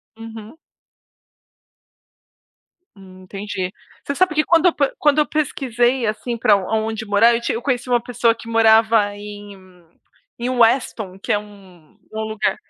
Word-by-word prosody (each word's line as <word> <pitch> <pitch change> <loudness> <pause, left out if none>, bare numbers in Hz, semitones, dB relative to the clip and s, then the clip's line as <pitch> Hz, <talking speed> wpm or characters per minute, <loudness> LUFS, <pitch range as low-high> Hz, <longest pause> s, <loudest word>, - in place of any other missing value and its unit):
Uhum. 225 +3 -11 2.4
Hum, 185 -1 -15
entendi. 190 -1 -5 0.3
Você 280 - -3
sabe 365 0 +1
que 305 - +3
quando 335 +2 +3
eu 345 - +3
pe 280 -2 0
quando 295 0 +2
eu 300 - +3
pesquisei, 255 -4 0
assim, 230 +2 -3
pra 215 -2 +4
onde 220 +3 -2
morar, 210 +3 +4
eu 235 - -2
ti - - -2
eu 230 - -4
conheci 255 -1 -2
uma 240 -1 +2
pessoa 235 -1 +1
que 230 0 -13
morava 220 -2 +3
em 205 0 -10 0.8
em 240 +1 -2
Weston, 230 -5 +1
que - - -4
é - - +2
um 190 -6 -17 0.2
um 220 - -3
lugar 220 -1 -1
225 Hz, 150 wpm, -20 LUFS, 205-245 Hz, 2.4 s, pra